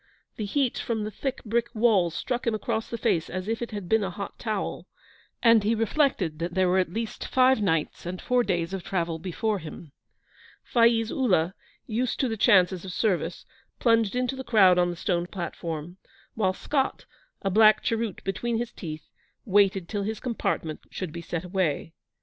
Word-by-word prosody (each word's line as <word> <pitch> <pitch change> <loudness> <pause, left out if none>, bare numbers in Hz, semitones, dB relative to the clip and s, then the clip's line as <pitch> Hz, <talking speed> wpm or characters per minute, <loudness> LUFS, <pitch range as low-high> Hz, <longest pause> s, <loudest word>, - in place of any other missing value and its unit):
The 215 - -3
heat 260 +4 0
from 225 -2 -2
the 215 - -4
thick 270 +4 -4
brick 235 +1 0
walls 205 -7 +3
struck 245 -2 -2
him 225 - +2
across 220 0 -2
the 235 - -3
face 165 -6 0
as 185 +1 -4
if 225 +1 -2
it 235 - -3
had 205 -4 -6
been 220 +3 +3
a 190 - -1
hot 195 +2 -7
towel, 215 -4 -3 0.6
and 230 -3 +6
he 220 +3 +2
reflected 220 - +1
that 170 +1 -3
there 185 -1 +3
were 185 +1 +3
at 180 -3 0
least 225 +2 -4
five 260 -2 +4
nights 165 -3 -1
and 180 +1 -4
four 250 0 +2
days 175 -3 -1
of 190 -2 -4
travel 170 -3 -2
before 195 +4 -2
him. 155 -1 -10 0.7
Faiz 230 -1 +3
Ullah, 185 -9 +2 0.3
used 240 +2 -1
to 265 - +2
the 225 - -2
chances 190 -5 +4
of 190 - -6
service, 180 -3 -1 0.3
plunged 230 -2 +2
into 250 +1 0
the 265 - -6
crowd 195 -7 +5
on 175 0 +3
the 175 - -4
stone 175 -1 -1
platform, 170 -2 -5 0.4
while 190 -4 +1
Scott, 270 +6 -1 0.4
a 195 - 0
black 215 +2 +6
cheroot 225 -3 -2
between 225 +5 -1
his 235 0 -3
teeth, 155 -4 -7 0.4
waited 195 -3 +3
till 205 +1 -2
his 215 +2 -3
compartment 190 -9 -2
should 185 -4 -5
be 170 +1 -6
set 170 0 -4
away. 180 -4 -1
205 Hz, 185 wpm, -26 LUFS, 175-230 Hz, 0.7 s, and